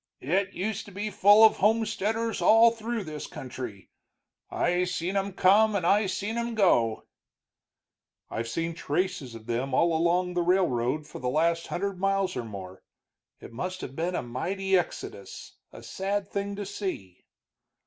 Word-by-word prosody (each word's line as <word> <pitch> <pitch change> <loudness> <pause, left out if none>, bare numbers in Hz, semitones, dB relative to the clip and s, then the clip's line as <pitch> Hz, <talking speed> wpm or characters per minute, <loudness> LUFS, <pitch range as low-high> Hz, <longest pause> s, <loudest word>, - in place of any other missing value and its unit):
"It 190 +7 0
used 205 +2 -3
to 205 - -12
be 205 +3 -4
full 205 +3 +7
of 220 - +4
homesteaders 220 +1 0
all 225 +1 +6
through 230 -1 -4
this 155 -3 -7
country 120 -7 -8 0.6
I 180 +1 +1
seen 180 +1 -3
'em 195 0 0
come 205 +3 +4
and 185 -4 0
I 200 +3 +3
seen 210 +4 -2
'em 235 0 -3
go." 120 - +2 1.2
"I've 115 +1 -4
seen 165 +8 -2
traces 165 -5 -2
of 110 -1 -11
them 120 +4 -2
all 170 -1 +3
along 175 +2 +1
the 175 - 0
railroad 155 -6 +1
for 150 - -10
the 125 - -2
last 165 +4 +1
hundred 195 0 -3
miles 195 -1 0
or 120 - -3
more. 95 -4 -9 0.6
It - - -12
must 185 +9 -4
have 130 - -7
been 175 +3 -2
a - - -2
mighty 190 +11 -1
exodus, 100 - -4
a - - -12
sad 200 +1 -3
thing 200 0 -3
to 205 0 -5
see." 185 - -6
185 Hz, 160 wpm, -27 LUFS, 145-200 Hz, 1.2 s, full